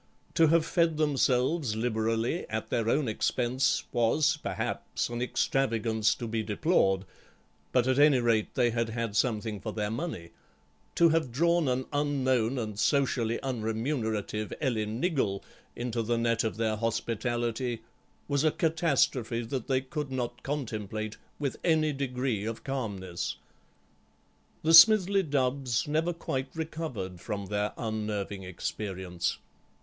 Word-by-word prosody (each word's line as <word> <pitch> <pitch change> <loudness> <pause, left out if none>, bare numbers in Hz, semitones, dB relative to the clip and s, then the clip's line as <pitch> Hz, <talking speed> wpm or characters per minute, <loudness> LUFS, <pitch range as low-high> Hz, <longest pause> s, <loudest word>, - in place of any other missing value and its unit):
To 165 - +5
have 165 0 +4
fed 165 -2 +1
themselves 140 -2 +1
liberally 115 +5 -1
at 110 0 -4
their 115 -1 +1
own 140 +1 +2
expense 125 +4 +1
was, 140 +6 +3
perhaps, - - -3
an 120 0 -4
extravagance 115 -4 +1
to 120 - -5
be 115 0 -1
deplored, 105 - +1 0.7
but, 125 -2 +3
at 130 +1 +2
any 145 -2 +6
rate, 115 -3 +1
they 120 -2 +3
had 115 0 -1
had 115 -2 -3
something 110 -3 0
for 110 +3 -5
their 105 -1 -2
money; 115 - -4 0.6
to 170 - +6
have 160 -5 +1
drawn 170 +4 +2
an 130 0 0
unknown 130 -4 +1
and 110 -4 -4
socially 125 -4 +1
unremunerative 110 -3 -2
Ellen 110 -4 -1
Niggle 130 - 0 0.3
into 120 -1 -2
the 115 +1 0
net 115 -1 +1
of 110 -1 -2
their 110 -1 0
hospitality 115 +1 -2 0.4
was 140 0 +1
a 155 - +5
catastrophe 140 -8 +1
that 125 +1 -4
they 130 -1 +2
could 145 +2 -5
not 120 -2 -3
contemplate 110 -6 -4 0.2
with 140 -3 -2
any 155 -3 +3
degree 125 -5 -2
of 115 +1 -5
calmness. 100 -10 -3 1.3
The 160 +1 +3
Smithly 195 +2 +8
Dubbs 135 - 0
never 160 +3 +1
quite 135 -5 -3
recovered 155 - -4
from 100 +1 -4
their 105 +1 -1
unnerving 105 -3 -3
experience. 90 -1 -3
120 Hz, 135 wpm, -29 LUFS, 110-140 Hz, 1.3 s, Smithly